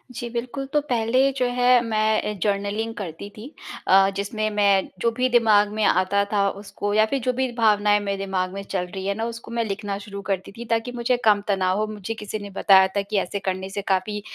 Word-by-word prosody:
जी, 240 - -5
बिल्कुल। 245 +3 -4
तो 300 - +4
पहले 255 0 +1
जो 250 - +1
है 250 -1 +5
मैं 215 -1 0
जर्नलिंग 205 +2 -1
करती 190 -1 -7
थी। 245 +7 -9 0.4
अ, 195 +1 +6
जिसमें 215 +2 -2
मैं 200 -2 +2
जो 235 - +2
भी 255 0 +2
दिमाग 215 -4 +4
में 215 0 -1
आता 185 +2 +2
था 200 -1 +2
उसको 205 0 -4
या 215 +1 +4
फिर 270 +5 -2
जो 250 +2 0
भी 260 0 -1
भावनाएँ 210 -2 +3
मेरे 200 -1 -3
दिमाग 190 -1 -2
में 195 - -5
चल 190 -2 -3
रही 190 +1 -7
है 200 - +1
ना 225 - -2
उसको 230 0 -7
मैं 235 0 0
लिखना 200 0 -4
शुरू 200 -1 -7
करती 190 -1 -2
थी 235 +4 -9
ताकि 230 +2 0
मुझे 245 +1 0
कम 210 -2 +5
तनाव 190 -2 +1
हो, 215 - +1
मुझे 215 0 -5
किसी 215 -1 -6
ने 205 0 -8
बताया 190 -1 +5
था 200 - +2
कि 200 +1 -3
ऐसे 195 +2 -3
करने 190 0 -3
से 200 +1 -4
काफ़ी 200 +2 -1
210 Hz, 220 wpm, -23 LUFS, 195-230 Hz, 0.4 s, अ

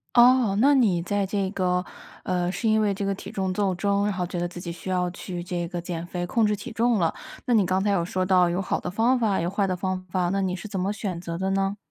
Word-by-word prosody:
哦， 240 -4 +6
那 280 +4 +5
你 205 -10 +3
在 200 +3 0
这 195 -1 -1
个， 180 -2 0 0.4
呃， 180 -1 0
是 220 +5 -2
因 220 0 +4
为 205 -2 +2
这 195 +1 -3
个 195 0 0
体 - - -9
重 190 -1 -1
斗 195 -1 +1
争， 200 +2 +1
然 210 - +1
后 180 -1 -2
觉 180 - -5
得 175 - 0
自 175 0 -6
己 175 - -6
需 175 +2 -7
要 180 -1 +1
去 175 0 -6
这 175 0 -3
个 175 - -4
减 170 -1 -5
肥， 175 0 -4
控 225 +3 +2
制 210 - +2
体 210 +5 -5
重 230 -1 +2
了。 165 -2 +1 0.3
那 245 - +1
你 210 -4 +4
刚 185 +2 +1
才 205 - +1
有 175 -4 +2
说 185 +1 -1
到 180 -2 +4
有 180 +2 -1
好 195 - -1
的 180 - -5
方 235 +6 +3
法， 215 -5 +1
有 170 +1 -1
坏 200 +1 0
的 185 - 0
方 185 0 -3
法， 180 -2 +1
那 195 - +1
你 185 -1 0
是 205 +3 -6
怎 200 -2 -5
么 190 +2 0
选 195 -4 -4
择 170 -1 -5
的 190 +1 -1
呢？ 195 +1 0
190 Hz, 300 characters per minute, -25 LUFS, 180-205 Hz, 0.4 s, 哦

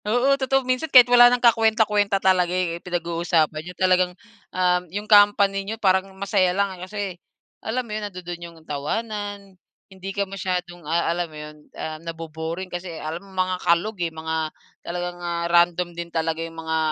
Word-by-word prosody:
Oo, 245 +6 +3
totoo 270 -1 +1
minsan 255 +5 -1
kahit 250 -2 +9
wala 245 0 +9
nang 245 - +2
ka-kwenta-kwenta 220 -3 +3
talaga 185 -2 +2
eh, 175 -2 -1
pinag-uusapan 170 -3 0
niyo, 180 +3 -9
talagang, 185 -1 +2 0.3
um, 180 -1 +1
'yong 205 +4 -5
company 205 -1 +5
niyo 210 +3 -5
parang 190 -2 +2
masaya 190 -2 +1
lang, 200 -1 +1
eh. 180 - -12
Kasi 210 - -6 0.6
alam 250 +3 -2
mo 215 - -7
'yon, 215 - -3
nandu-do'n 175 -2 -8
'yong 170 -1 -10
tawanan, 205 +6 -4 0.4
hindi 190 0 -8
ka 200 +1 -1
masyadong, 180 -2 -4
ah, 170 +1 +1
alam 175 -1 -3
mo 155 - -12
'yon, 150 0 -9 0.2
ah, 155 0 -5
nabo-boring. 165 +2 -6
Kasi 175 -2 -5
alam 160 +2 -5
mo 200 - -17
mga 185 0 0
kalog, 185 +6 +1
eh, 170 - 0
mga 160 0 -5 0.5
talagang, 175 0 -5
ah, 170 -1 -2
random 175 0 +3
din 170 0 -6
talaga 165 -1 -2
'yong 165 0 -7
mga, 160 0 -2
180 Hz, 175 wpm, -23 LUFS, 170-205 Hz, 0.6 s, kahit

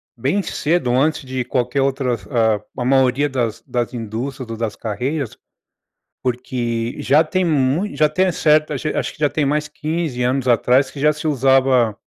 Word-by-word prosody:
bem 140 - 0
cedo, 150 -5 0
antes 140 +3 +1
de 130 -1 -3
qualquer 125 +2 0
outras, 130 -3 -1
ah, 110 -5 +2 0.2
a 120 - -2
maioria 135 +1 +3
das 120 -4 -2
das 120 0 -2
indústrias 120 +3 -5
ou 115 - -5
das 110 -2 -3
carreiras. 125 +5 -3 0.8
Porque 120 -2 -2
já 150 +5 +4
tem 185 +3 0
mui 155 +6 +1
já 150 -1 +3
tem 185 +4 +2
certo, 155 -1 +2
acho 150 +3 -3
acho - - -2
que - - -20
já 150 -2 +2
tem 150 -2 0
mais 150 +1 0
15 155 -4 -3
anos 130 +1 0
atrás 125 +3 +3
que 140 - -9
já 150 +1 +3
se 150 +1 -9
usava, 130 -5 +3
130 Hz, 175 wpm, -20 LUFS, 120-150 Hz, 0.8 s, já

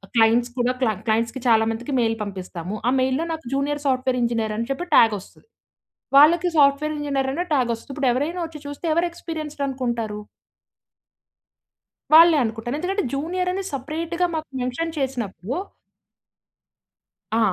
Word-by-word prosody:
Clients 235 +2 +4
కూడా 245 +1 +1
క్ల 250 - +3 0.2
క్లయింట్స్‌కి 230 +3 0
చాలా 225 -2 +5
మందికి 240 +5 -5
మెయిల్ 225 -1 +1
పంపిస్తాము. 185 -1 -6
ఆ - - +3
మెయిల్లో 260 +4 +1
నాకు 320 0 -7
జూనియర్ 290 +1 -1
సాఫ్ట్‌వేర్ 255 -1 +1
ఇంజినీర్ 225 -2 -1
అని 230 +1 -2
చెప్పి 310 +6 -3
టాగ్ 225 -2 +6
వస్తది. 190 - -18 0.7
వాళ్ళకి 335 +5 +6
సాఫ్ట్‌వేర్ 290 +1 +4
ఇంజినీర్ 280 -2 -1
ఆనే 350 +5 -2
టాగ్ 255 -4 +2
వస్తది. 230 +4 -9
ఇప్పుడు 270 -2 +1
ఎవరైనా 295 +8 -1
వచ్చి 320 -2 -9
చూస్తే 285 +4 -7
ఎవరు 340 +2 +2
ఎక్స్‌పీరియన్స్‌డ్ 310 -4 -6
అనుకుంటారు? 235 -5 -3 1.9
వాళ్ళే 330 0 +8
అనుకుంటాను. 225 +4 -3
ఎందుకంటే 385 +4 -1
జూనియర్ 360 +6 -1
అని 390 +1 -3
సపరేట్‌‌‌గా 320 +6 -2
మాకు 315 0 -4
మెన్షన్ 315 +7 -3
చేసినప్పుడు 245 -6 -3 1.8
ఆ! - - +3
270 Hz, 140 wpm, -23 LUFS, 235-315 Hz, 1.9 s, వాళ్ళే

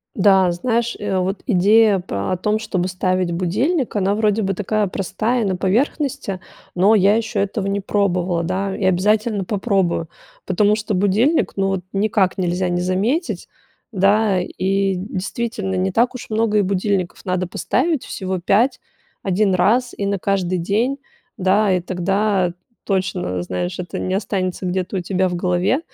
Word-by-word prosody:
Да, 190 -2 +4
знаешь, 235 +6 -1
э, 205 -1 -4
а 190 -1 +1
вот 190 +2 -2
идея 210 0 +4
па 100 - -3
о - - +1
том, 210 +4 0
чтобы 185 -5 -2
ставить 185 -1 0
будильник, 225 - 0
она 200 0 +1
вроде 215 0 +1
бы 195 -1 0
такая 210 +2 0
простая, 220 +6 -1
на 190 -2 0
поверхности, 240 - -1 0.4
но 195 +5 +4
я 205 0 +4
еще 225 -2 -1
этого 200 0 -2
не 200 0 -1
пробовала, 185 -4 0
да, 190 +3 -2
и - - -3
обязательно 205 +3 +2
попробую, 190 -5 0 0.4
потому 205 +3 +2
что 215 0 -3
будильник- 205 - +2
ну 195 0 +1
вот 195 -1 -1
никак 195 -2 +1
нельзя 180 0 0
не 175 0 -1
заметить, 210 - -1 0.4
да. 200 -1 +3
И, 195 +1 0
действительно, 195 +1 -3
не 185 +1 0
так 240 +6 +2
уж 250 - -8
много 220 -1 +1
и - - +4
будильников 190 -1 -1
надо 185 0 -1
поставить, 310 - -1
всего 190 -1 -4
5, 210 +9 +2 0.4
1 195 +1 +1
раз, 225 +8 +2
и 200 - -3
на 200 0 0
каждый 185 -1 0
день, 220 +10 0 0.4
да, 195 +2 +3
и 180 - +1
тогда 185 +1 0 0.3
точно, 185 - -1
знаешь, 90 0 -3
это 180 -1 -5
не 185 - -2
останется 190 -2 -2
где-то 185 +2 -2
у - - 0
тебя 185 +1 0
в 180 - -3
голове, 180 - +1
195 Hz, 160 wpm, -20 LUFS, 185-215 Hz, 0.4 s, Да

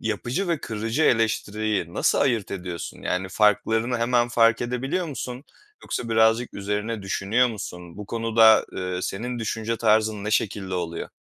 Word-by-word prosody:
yapıcı 120 - -2
ve 165 -4 0
kırıcı 115 +6 -2
eleştiriyi 110 - 0
nasıl - - +2
ayırt 120 -7 +1
ediyorsun? 90 -3 -6
Yani, 95 +1 -2
farklarını 110 +4 +2
hemen 120 0 +2
fark 115 -1 +3
edebiliyor 135 +9 -2
musun 130 -2 -6 0.4
yoksa 115 - -4
birazcık 110 +2 +2
üzerine 105 +2 -3
düşünüyor 105 +6 +1
musun? 90 -5 -8
Bu 105 -1 -8
konuda, 115 -1 +4
eee, 90 -1 -3
senin 120 +5 -4
düşünce 110 0 -2
tarzın 110 -2 +2
ne 105 - -2
şekilde 95 -3 -1
oluyor? 85 -2 -4
110 Hz, 145 wpm, -24 LUFS, 100-120 Hz, 0.4 s, konuda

